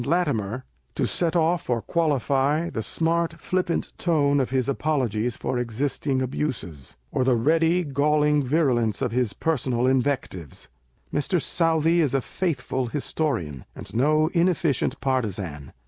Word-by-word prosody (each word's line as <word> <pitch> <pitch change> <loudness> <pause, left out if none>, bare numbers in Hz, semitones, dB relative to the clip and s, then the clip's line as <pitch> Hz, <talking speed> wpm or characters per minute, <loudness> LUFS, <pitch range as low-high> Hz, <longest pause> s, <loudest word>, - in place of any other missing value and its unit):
17 130 - -4
Latimer,1 125 - 0 0.3
to - - +1
set 170 -2 0
off 170 -2 +1
or 120 -1 +2
qualify 145 +2 +1
the 110 - -3
smart 165 +5 0
flippant 180 0 -1
tone 145 -4 +2
of 130 - 0
his 130 -1 0
apologies 125 -6 -1
for 125 - -2
existing 130 +3 -1
abuses, 110 - -4
or 130 - +1
the 125 -1 +3
ready, 165 +8 +2
galling 150 0 +2
virulence 125 - +1
of 120 - 0
his 120 -4 0
personal 125 -5 0
invectives. 130 - -1 0.4
Mr. 175 +5 +1
Southey 165 +1 +2
is 140 -4 +1
a 135 - +2
faithful 130 -6 -2
historian, 115 - -2
and - - -10
no 155 +6 +3
inefficient 170 -6 +1
partisan. 100 - -2
140 Hz, 135 wpm, -24 LUFS, 125-160 Hz, 0.4 s, the